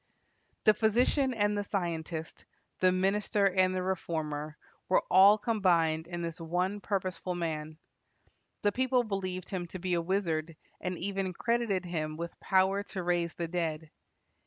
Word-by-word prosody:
The 215 - +6
physician 245 +6 +2
and 205 -1 +2
the 205 - -1
scientist, 165 -4 -4 0.3
the 185 0 +5
minister 200 +2 +1
and 185 -1 +3
the 185 - -1
reformer, 155 -5 -3 0.3
were 185 - +4
all 195 +3 +8
combined 170 -8 +2
in 175 -1 -4
this 165 0 -5
one 180 +5 -1
purposeful 185 -2 -2
man. 155 -2 -3 0.9
The 205 - +4
people 255 +1 +2
believed 185 -4 -4
him 180 -3 -3
to 185 - -7
be 180 0 -2
a 170 - +2
wizard, 165 -3 -1 0.2
and 180 -1 -3
even 195 0 -2
credited 230 -3 0
him 155 -3 -3
with 170 0 -6
power 190 +1 +2
to 195 -2 -6
raise 175 -1 0
the 170 - -3
dead. 160 -2 -3
185 Hz, 150 wpm, -30 LUFS, 170-200 Hz, 0.9 s, all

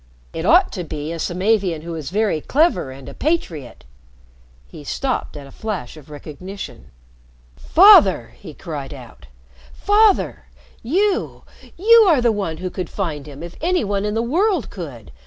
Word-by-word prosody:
It - - -3
ought - - +5
to 180 - -5
be 155 -1 -5
a 170 - -5
Samavian 185 -2 0
who 170 0 -6
is 155 -4 -6
very 205 -4 0
clever 310 - +1
and 130 0 -11
a - - -8
patriot 180 - -3 0.4
" - - -30
He 145 - -12
stopped 260 - -3
at 145 - -9
a 135 - -14
flash 205 - -5
of 150 -2 -15
recognition. 150 - -9 0.7
"Father!" 195 - +6
he 155 -7 -11
cried 145 -5 -7
out. 120 - -14 0.5
"Father! 415 0 +2 0.4
You 380 - -1 0.3
you 450 +3 +6
are 310 -6 +4
the 240 -1 +3
one 195 -7 -3
who 180 +1 -5
could 180 -2 -5
find 155 -7 -4
him 145 +2 -10
if 170 - -9
any 355 -2 +1
one 200 -1 -1
in 210 +1 -2
the 225 - 0
world 350 - 0
could. 140 - -9
180 Hz, 165 wpm, -20 LUFS, 145-245 Hz, 0.7 s, Father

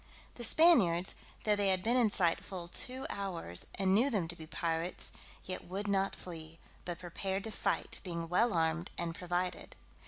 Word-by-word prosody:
The 240 - -7
Spaniards, 220 - +6 0.3
though 210 -1 +3
they 205 -1 +1
had 185 -1 +2
been 235 +2 +2
in 240 -4 +5
sight 175 -4 +2
full 180 -3 -6
two 255 +8 -2
hours, 175 - -3
and 190 -1 +2
knew 235 +8 +4
them 200 -10 0
to 170 - -4
be 160 -2 -10
pirates, 165 +1 -2 0.3
yet 185 - -5
would 195 +3 -3
not 195 -1 +1
flee, 165 -2 -8 0.3
but 175 -1 -3
prepared 190 +2 -3
to 220 - -4
fight, - - -1
being 170 -3 -4
well 225 +8 +3
armed, 165 0 +1
and 170 -1 -2
provided. 180 +1 -2
185 Hz, 180 wpm, -33 LUFS, 170-205 Hz, 0.3 s, Spaniards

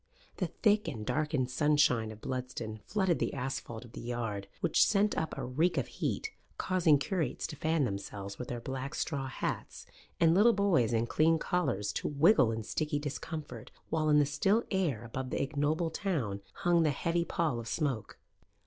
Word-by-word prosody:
The - - 0
thick 210 -1 +2
and 110 -5 -4
darkened 150 -3 0
sunshine 145 -6 +3
of 110 0 -12
Bludston 125 -4 -4
flooded 190 -5 +1
the - - -1
asphalt 125 -3 -4
of 120 - -14
the - - -8
yard, 115 -4 -3
which - - +4
sent 210 0 +2
up 160 - -2
a - - -3
reek 155 +8 +1
of - - +1
heat, 440 - -3 0.3
causing 175 -5 +3
curates 150 -2 -2
to - - -5
fan 160 +1 +1
themselves 100 -1 -5
with 125 - -5
their 120 - -4
black 135 +3 -5
straw 140 -4 -2
hats, 130 - -4 0.3
and 165 -1 +5
little 215 +6 +6
boys 190 - +3
in 115 0 +2
clean 160 +6 +3
collars 150 - -1
to - - -2
wriggle 140 - +5
in 110 0 -3
sticky 150 +6 -1
discomfort, 145 -3 -5 0.2
while 155 -1 +1
in 150 - +6
the 145 - +5
still 195 +11 +2
air 165 - 0
above 130 +3 -5
the - - -2
ignoble 150 +4 0
town 135 - -2
hung 175 -1 +2
the 160 - +3
heavy 170 +4 0
pall 160 -7 -1
of 115 - -7
smoke. 135 -6 -2
145 Hz, 180 wpm, -31 LUFS, 120-165 Hz, 0.3 s, little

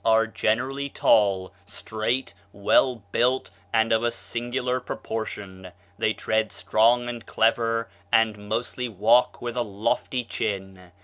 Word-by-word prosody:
are 115 0 +4
generally 130 +5 -1
tall, 100 -7 +2
straight, 110 +5 -2 0.2
well 100 +6 +3 0.2
built, 125 +2 +1 0.2
and 115 0 +3
of 120 +1 +2
singular 125 +2 -2
proportion; 100 -6 -6 0.3
they - - +2
tread 110 -2 -1
strong 115 +7 +2
and 120 -1 -5
clever, 115 0 +1 0.2
and 115 -2 +4
mostly 120 +2 -2
walk 115 +6 +3
with 120 0 -4
a 125 - 0
lofty 110 +4 -1
chin.... 95 -5 -4
115 Hz, 120 wpm, -25 LUFS, 105-120 Hz, 0.3 s, are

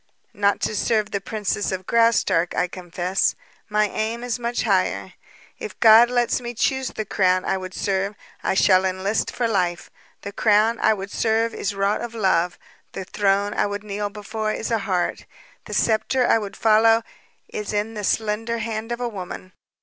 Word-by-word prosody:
"Not 200 -1 +1
to 215 - -1
serve 215 +1 0
the 200 - -2
princess 210 -1 -2
of 185 -1 -4
Graustark, 230 -7 +2
I 180 - +1
confess. 180 +1 -1 0.3
My 210 0 +2
aim 225 +3 -3
is 245 -1 -2
much 240 0 -2
higher. 195 -5 0 0.5
If 440 - -7
God 225 +2 +8
lets 245 0 +1
me 240 0 -6
choose 265 +3 0
the 215 - -5
crown 185 -2 +1
I - - +1
would 185 -1 -7
serve, 195 +1 -1 0.3
I - - 0
shall 185 -1 +5
enlist 190 +3 -1
for 240 - -1
life. 180 -4 -1 0.3
The 200 - -6
crown 215 +2 +3
I 220 - +3
would 195 0 -7
serve 225 +1 +1
is 200 0 -3
wrought 200 +1 0
of 235 -1 -6
love, 185 -5 +1 0.4
the 190 - -5
throne 200 +1 +1
I - - +1
would 205 0 -5
kneel 205 0 -3
before 215 +1 -4
is 220 - -4
a 225 - +2
heart, 190 -3 -2 0.4
the - - -7
sceptre 230 +3 +2
I 225 - +4
would 205 -2 -7
follow 225 +1 +4 0.5
is 210 -1 -5
in 210 +1 -1
the 210 -1 -5
slender 225 +3 -1
hand 225 0 -4
of 235 +1 -3
a 245 - 0
woman. 185 -3 -7
210 Hz, 180 wpm, -23 LUFS, 195-225 Hz, 0.5 s, God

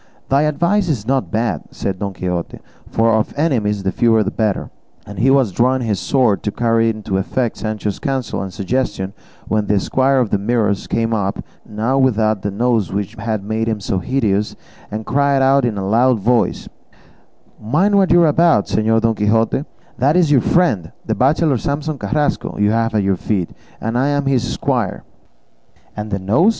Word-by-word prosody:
"Thy 135 +1 +3
advice 175 +5 +1
is 120 -9 -1
not 135 0 0
bad," 110 -8 -1
said 95 -2 -4
Don 100 -1 -3
Quixote, 90 -2 -4 0.3
"for 115 0 +2
of 110 0 0
enemies 110 -10 0
the 95 - 0
fewer 110 +2 +3
the 100 - -3
better;" 110 -3 -1 0.3
and 100 -2 -8
he 125 +5 +3
was 135 -6 +3
drawing 125 +5 +1
his 105 -4 -1
sword 125 -7 +1
to 105 - -2
carry 115 0 +1
into 105 -3 -2
effect 120 +4 -2
Sancho's 105 -2 -3
counsel 135 -6 -2
and 95 -1 -5
suggestion, 100 -2 -2 0.3
when 105 -1 0
the 100 0 +2
squire 135 +6 +1
of 125 -5 +1
the 100 - +1
Mirrors 105 -2 0
came 115 0 0
up, 100 -3 -2 0.2
now 115 +6 0
without 110 -5 +2
the 100 - -2
nose 115 -1 0
which 100 -1 -3
had 110 -3 -3
made 110 +2 -2
him 110 -2 -1
so 95 -1 -2
hideous, 105 -3 -1 0.3
and 110 +1 -5
cried 140 +2 +2
out 135 0 +4
in 110 -4 -2
a 95 -1 -3
loud 120 +3 +3
voice, 120 +4 0 0.9
"Mind 155 - +1
what 195 -2 +3
you 175 0 +6
are - - +4
about, 155 -7 +3
Señor 115 +1 +1
Don 115 0 +2
Quixote; 110 +6 +1 0.3
that 140 +6 +3
is 170 -4 +3
your 135 -4 +5
friend, 110 - +1
the - - 0
bachelor 140 0 +2
Samson 145 +2 -3
Carrasco, 145 +9 -1
you 105 0 +2
have 115 0 0
at 105 - +2
your 95 -1 +1
feet, 95 -2 -2 0.3
and 115 +1 -3
I 130 +3 +2
am 145 -1 0
his 125 -3 0
squire." - - -2 0.9
"And 105 0 -5
the 100 - -1
nose?" 110 - +3
115 Hz, 185 wpm, -18 LUFS, 105-135 Hz, 0.9 s, you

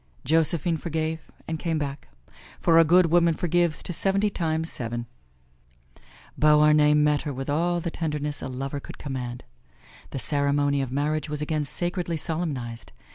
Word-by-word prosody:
Josephine 165 +2 +2
forgave 160 0 -3 0.2
and 160 -1 -3
came 165 -2 -1
back; 140 -1 -4 0.5
for 165 -1 +5
a - - +8
good 170 +1 +4
woman 170 -1 +4
forgives 175 -1 +1
to 175 - -3
seventy 195 +4 +2
times 160 -3 -1
seven. 120 0 -4 1.3
Beauharnais 150 0 +5
met 150 0 +3
her 150 - -4
with 135 +1 -4
all 175 +3 +1
the 170 0 -4
tenderness 150 -3 -3
a - - -4
lover 135 +2 -4
could - - -11
command. 125 -4 -5 0.7
The - - -6
ceremony 140 0 +1
of 130 -2 -4
marriage 150 +3 -1
was 150 0 -2
again 150 -1 -1
sacredly 175 +2 -2
solemnized. 140 -9 -4
150 Hz, 150 wpm, -25 LUFS, 140-165 Hz, 1.3 s, a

